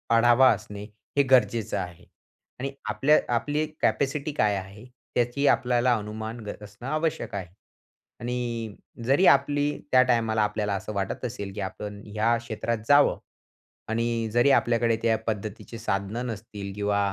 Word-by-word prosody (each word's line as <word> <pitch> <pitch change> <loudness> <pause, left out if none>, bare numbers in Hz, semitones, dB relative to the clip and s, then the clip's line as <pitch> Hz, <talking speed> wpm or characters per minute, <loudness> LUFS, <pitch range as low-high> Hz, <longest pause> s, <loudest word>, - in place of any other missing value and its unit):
आढावा 120 +3 +6
असणे 100 +1 -8 0.3
हे 140 - +6
गरजेचं 120 -4 +3
आहे. 90 -2 -6 0.5
आणि 135 +1 -3 0.2
आपल्या 150 +3 +4 0.2
आपली 145 +6 0 0.2
कॅपॅसिटी 140 +2 0
काय 105 -7 +2
आहे, 95 +4 -9 0.3
त्याची 120 +4 +1
आपल्याला 125 -1 +3
अनुमान 110 +2 -6
ग 105 - -4
असणं 105 +4 -10
आवश्यक 155 -5 -1
आहे. 95 -3 -4 0.7
आणि 120 -3 -3 0.3
जरी 140 +9 +4
आपली 145 +1 +4 0.2
त्या 130 0 +7
टायमाला 115 -3 +1
आपल्याला 105 -1 0
असं 100 +2 -5
वाटत 100 +5 -3
असेल, 100 -5 -5
की 105 - -5
आपण 100 +2 -6
ह्या 110 +3 +1
क्षेत्रात 115 0 -3
जावं 145 0 +5 0.7
आणि 115 0 0
जरी 120 +4 +4
आपल्याकडे 115 -2 +3
त्या 115 -1 +3
पद्धतीची 110 +1 -4
साधनं 105 +2 -2
नसतील, 100 -3 -6
किंवा 105 0 0
115 Hz, 140 wpm, -26 LUFS, 105-125 Hz, 0.7 s, त्या